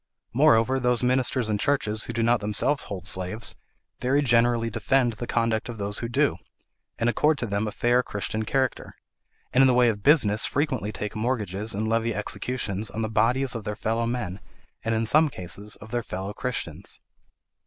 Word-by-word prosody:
Moreover, 130 -2 +4
those 125 -1 +2
ministers 125 -1 +2
and 105 -1 -1
churches 110 -6 0
who - - -5
do 115 0 0
not 120 +1 +3
themselves 105 +8 0
hold 95 -3 -6
slaves, 95 +5 -1 0.5
very 140 +3 +2
generally 120 -2 +3
defend 120 +2 +1
the 120 +3 -6
conduct 115 0 0
of 120 - -6
those 105 0 -2
who 115 - -4
do, 120 - +1 0.6
and 115 - 0
accord 150 +5 +2
to 125 - -2
them 100 0 -1
a - - -3
fair 120 +3 +2
Christian 110 -1 -3
character, 130 +3 -1 0.6
and 130 - +5
in 135 - +7
the 125 - +3
way 125 -1 +5
of 105 -2 -3
business 110 -5 +4
frequently 130 -7 -1
take 105 +1 -5
mortgages 110 -3 -1
and 110 +2 -1
levy 115 0 0
executions 105 -1 -2
on 110 - -4
the 110 - -2
bodies 125 +4 +2
of 115 -3 -5
their 105 0 -4
fellow 115 +2 -1
men, 115 -6 -3 0.4
and 115 0 0
in 110 +1 +1
some 155 +6 +5
cases 100 0 -5
of 110 - -13
their 120 - 0
fellow 95 -1 -5
Christians. 125 +3 -3
115 Hz, 185 wpm, -25 LUFS, 105-125 Hz, 0.6 s, in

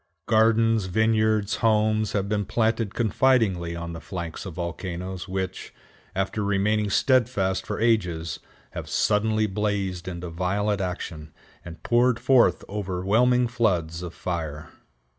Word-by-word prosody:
Gardens, 115 -1 +3
vineyards, 110 +1 +1
homes 110 -1 +2
have 100 -1 0
been 105 0 0
planted 110 0 0
confidingly 110 -7 +2
on 85 0 -5
the 80 - -7
flanks 85 0 -6
of 90 - -8
volcanoes 90 +1 -5
which, 95 0 -4 0.4
after 95 +2 -1
remaining 105 +1 +1
steadfast 110 -5 +1
for - - -3
ages, 90 -8 0 0.3
have - - -7
suddenly 110 +1 +2
blazed 100 -3 -2
into 90 -1 -5
violent 100 +4 -1
action, 85 -4 -5 0.3
and 85 -1 -11
poured 120 0 +3
forth 130 -3 +4
overwhelming 105 +6 +1
floods 90 -9 0
of 90 -1 -7
fire. 80 -4 -4
100 Hz, 120 wpm, -25 LUFS, 90-110 Hz, 0.4 s, forth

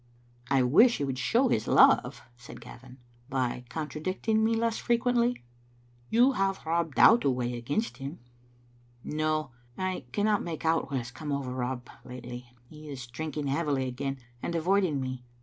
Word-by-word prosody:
"I 135 -2 +3
wish 220 - +5
he - - -2
would 135 -2 -2
show 250 - +2
his 110 - 0
love," - - +4
said 120 0 -12
Gavin, 130 +1 -13 0.3
"by 125 -2 -2
contradicting 165 - -1
me 225 +1 +2
less 230 0 0
frequently." 240 - +1 0.7
You 245 +4 +5
have 195 -7 -1
Rob 165 -2 -1
Dow 230 - +8
to 190 - 0
weigh 125 -1 -1
against 145 - -2
him." 140 +5 -6 0.9
"No; 155 -2 -1 0.3
I 185 -7 -3
cannot 205 +5 +1
make 165 -2 -5
out 160 0 +1
what 140 - -1
has 120 -1 -5
come 150 +3 -6
over 140 -3 -2
Rob 125 0 -3 0.2
lately. 125 -1 -9 0.2
He 150 +2 -12
is 130 -4 -6
drinking 150 +4 -5
heavily 140 -2 0
again, 135 +2 -3 0.2
and 170 - -3
avoiding 175 -2 +2
me. 130 -1 -4
150 Hz, 160 wpm, -28 LUFS, 130-190 Hz, 0.9 s, Dow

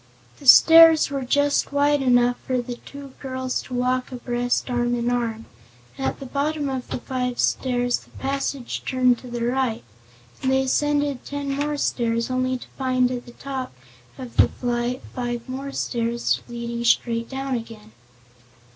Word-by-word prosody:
The 280 - -9
stairs 325 +2 +8
were 275 -1 -2
just 285 +3 +1
wide 285 0 +2
enough 245 -1 +3
for 255 -1 +1
the 245 0 -5
two 280 -1 -10
girls 260 -1 -3
to 255 - -7
walk 255 +1 0
abreast, 245 -1 -1
arm 245 -1 0
in 240 0 -1
arm. 230 -2 -2 0.5
At 135 0 -3
the 275 - -7
bottom 285 +2 -1
of 260 -2 -4
the - - -3
five 250 -1 -3
stairs 245 -1 +1
the - - -20
passage 275 -2 -3
turned 255 -2 +2
to 255 - -11
the 240 -1 -3
right, 250 -2 0 0.6
and 260 - +1
they 265 0 +3
ascended 290 0 0
ten 285 -1 -4
more 290 +2 -1
stairs, 235 -3 0
only 255 0 0
to - - -12
find 255 -1 +2
at 245 -1 -5
the 240 - -12
top 265 - -6 0.4
of 250 -3 -9
the - - +7
flight 245 +1 -2
five 240 -2 -3 0.3
stairs 235 0 -1
leading 235 0 -5
straight 230 -1 +1
down 270 0 -3
again. 225 - -6
255 Hz, 160 wpm, -23 LUFS, 240-275 Hz, 0.6 s, stairs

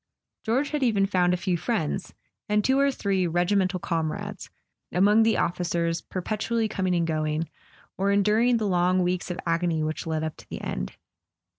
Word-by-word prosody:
George 255 +6 0
had 300 -1 -1
even 215 -6 +3
found 180 -2 +2
a 180 - +1
few 180 0 0
friends, 195 -2 -2 0.3
and 210 0 +2
two 265 +1 +3
or 280 0 +4
three 195 -7 0
regimental 185 +2 +1
comrades, 185 +5 -3 0.4
among 205 +5 +4
the 225 0 +3
officers 170 -1 0
perpetually 220 +4 -2
coming 185 -4 -1
and 170 -1 +1
going, 155 0 -1 0.5
or 195 - +1
endur¬ 210 +4 +3
ing 245 - +4
the 220 - -1
long 180 0 +2
weeks 180 +1 -1
of 175 - -4
agony 165 -1 +1
which 155 +1 -3
led 160 -1 -1
up 160 -1 -3
to - - -16
the - - -5
end. 60 0 -4
185 Hz, 175 wpm, -26 LUFS, 170-210 Hz, 0.5 s, or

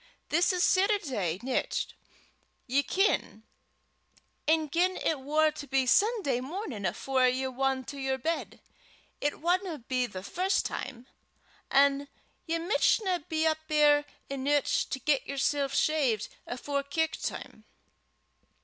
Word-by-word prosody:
This 340 +4 +3
is 360 -1 +1
Setterday 270 - +1
nicht, 260 0 -1 0.7
ye 270 +2 +2
ken; 365 - 0 1.0
an' 315 0 +3
gien 355 +5 +1
it 310 - 0
war 305 +3 +2
to 295 -1 -9
be 265 0 +2
Sunday 385 - +2
mornin' 265 - -4
afore 260 +8 +1
ye 255 +1 0
wan 265 0 -1
to 280 +2 -8
yer 265 0 -1
bed, 325 +6 -3 0.6
it 290 0 -1
wadna 355 0 0
be 255 -1 0
the 190 -4 -8
first 370 - 0
time, 250 -2 -5 0.6
an' 280 +1 +3 0.4
ye 330 +1 0
michtna 360 0 +1
be 315 0 +1
up 315 0 +2
ear' 295 -1 +4 0.2
eneuch 275 +1 +1
to - - -2
get 280 0 0
yersel 280 +1 0
shaved 270 -6 +1 0.2
afore 280 +3 -2
kirk 315 +3 -1
time." - - -6
285 Hz, 130 wpm, -29 LUFS, 265-325 Hz, 1.0 s, ear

